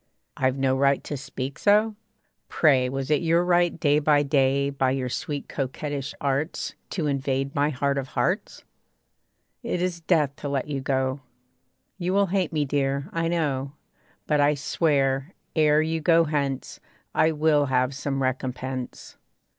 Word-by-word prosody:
'I've 130 0 0
no 135 -1 +2
right 140 +1 +2
to 145 - -4
speak 135 0 -6
so?' 215 +2 +4 0.6
Pray 130 -5 +3
Was 135 +2 -3
it 150 - +3
your 170 +1 +2
right 175 -1 +2
day 145 -2 +3
by 145 -1 +3
day 140 -1 +2
By 135 -2 +1
your 130 -1 -1
sweet 145 +2 -4
coquettish 140 +1 -4
arts 140 +3 -2 0.2
To 170 -5 -2
invade 135 -1 -1
my 145 +1 +2
heart 140 0 0
of 135 - -5
hearts? - - -1 1.0
It - - -2
is 180 -1 -1
death 155 -5 +1
to 145 - -5
let 140 -1 -1
you 140 -2 -3
go. 130 0 -1 0.8
You 180 +1 -1
will 200 0 +4
hate 190 -4 +1
me, 150 -2 0
dear, 140 +2 -1
I 165 -1 0
know; 145 -5 -1 0.5
But 150 -1 +2
I 145 +1 +4
swear, 140 0 0 0.2
ere 155 -1 +4
you 160 0 -2
go 165 +1 +5
hence, 140 -4 -2 0.3
I 160 - +3
will 150 -2 +2
have 130 +1 +1
some 135 0 -2
recompense. 130 0 -4
140 Hz, 155 wpm, -25 LUFS, 135-155 Hz, 1.0 s, go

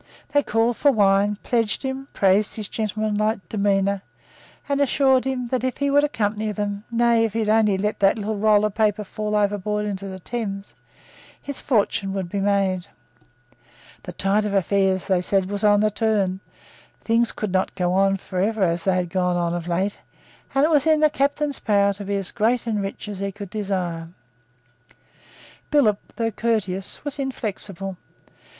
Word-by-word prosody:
They 290 - +5
called 225 -1 +1
for 285 - +4
wine, 205 -2 +3
pledged 230 -1 0
him, 265 0 -4
praised 200 +2 +2
his 215 -2 -4
gentlemanlike 215 0 -1
demeanour, 200 -1 +1 0.7
and 280 0 0
assured 265 -1 +3
him 260 -2 -2
that, 255 0 -1
if 255 -2 -1
he 280 0 0
would 285 +1 +4
accompany 215 -6 -1
them, 205 0 -3
nay, 235 -1 +3
if 225 -2 -1
he 225 - -1
would 215 - -1
only 215 -3 +3
let 210 +2 -2
that 195 +2 +4
little 215 0 -3
roll 210 0 +4
of 210 - -1
paper 215 -1 +1
fall 210 +1 -3
overboard 210 0 0
into 200 -1 -4
the 190 -1 -6
Thames, 200 -1 -5 0.7
his 285 - -6
fortune 205 -5 0
would 190 -3 -3
be 200 - -2
made. 195 -2 +1 1.1
The - - -8
tide 200 +2 +1
of 205 -1 -2
affairs, 190 -1 +1
they 190 -3 +2
said, 190 +1 +1
was 205 0 -3
on 205 -1 +5
the 215 0 +2
turn, 205 -4 0 0.6
things 230 +1 +2
could 210 -3 -4
not 185 0 0
go 180 -2 0
on 195 +1 +3
for 185 -1 -4
ever 215 +1 +1
as 170 -1 +1
they 190 -1 +3
had 180 -2 -1
gone 180 -1 +1
on 170 -1 0
of 175 -1 -4
late 185 +4 -1 0.6
and 275 +2 +5
it 325 - +1
was 295 -1 +3
in 310 -1 +4
the 305 -1 +5
captain's 285 0 0
power 200 -2 +2
to 200 +1 -8
be 200 +1 -1
as 195 -2 -3
great 235 +2 +1
and 220 -3 -1
as - - -2
rich 195 +2 -6
as 205 -2 -6
he 200 0 -2
could 200 -1 -9
desire. 185 -6 -3 1.6
Billop, 230 -9 +3 0.2
though 225 -1 -1
courteous, 210 -1 -2
was 290 0 -3
inflexible. 200 -7 -4
210 Hz, 185 wpm, -23 LUFS, 195-225 Hz, 1.6 s, They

